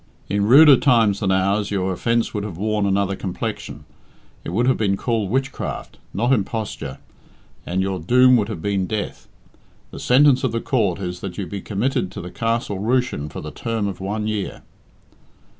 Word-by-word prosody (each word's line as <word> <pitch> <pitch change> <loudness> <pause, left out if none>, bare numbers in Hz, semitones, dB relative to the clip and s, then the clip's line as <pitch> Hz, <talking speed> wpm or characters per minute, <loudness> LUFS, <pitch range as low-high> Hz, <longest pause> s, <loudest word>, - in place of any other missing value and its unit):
In 100 +1 +1
ruder 140 +3 +8
times 115 -7 +3
than 100 -3 0
ours 100 +2 +1
your 95 -2 -1
offence 115 +5 0
would 105 -2 -2
have 100 -6 -6
worn 105 +1 0
another 100 0 +1
complexion; 95 -2 -5 0.6
it - - -5
would 110 +8 +1
have 130 0 +3
been 100 -3 0
called 110 -4 -1
witchcraft, 135 +3 -3
not 120 +3 +1
imposture, 105 - -3 0.7
and 95 +2 0
your 95 -1 -2
doom 125 +9 +5
would 105 -1 -1
have 95 -7 -6
been 100 -2 0
death. 110 -2 -4 0.6
The - - -8
sentence 130 +1 +4
of 130 -4 0
the 115 - 0
court 110 -9 0
is 90 -2 -4
that 90 -2 -7
you 100 - -3
be 100 +2 -6
committed 115 +2 -1
to - - -6
the 90 - -7
Castle 115 -4 -2
Rushen 110 - 0
for - - -7
the 75 - -7
term 115 0 -2
of 95 - -5
one 105 +3 -3
year." 105 -2 -3
105 Hz, 180 wpm, -21 LUFS, 95-120 Hz, 0.7 s, ruder